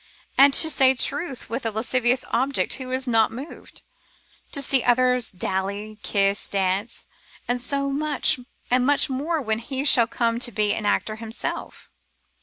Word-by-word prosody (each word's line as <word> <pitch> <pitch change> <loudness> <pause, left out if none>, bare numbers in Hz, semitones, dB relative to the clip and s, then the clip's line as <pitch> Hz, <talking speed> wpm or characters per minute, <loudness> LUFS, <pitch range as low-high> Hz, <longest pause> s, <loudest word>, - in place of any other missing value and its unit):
And 275 +1 +7
to 320 - +5
say 265 -2 +4
truth, 280 +2 -3
with 235 +4 -4
a 225 - 0
lascivious 245 +3 0
object 265 +3 +1
who 260 -1 -4
is 260 +1 -2
not 225 -2 +3
moved, 270 +7 -9 0.7
to - - -2
see 275 -1 +3
others 250 0 +2
dally, 200 +3 -4
kiss, 200 -1 0
dance? 195 +3 -1 0.4
And 245 0 -1 1.2
much 280 +3 +3
more 305 +5 -1
when 220 -1 -1
he 265 +4 -4
shall 235 -5 +6
come 230 -1 -1
to 240 -1 -2
be 210 0 +1
an 215 -1 -3
actor 215 +1 0
himself. 225 +1 -6
240 Hz, 145 wpm, -23 LUFS, 215-265 Hz, 1.2 s, And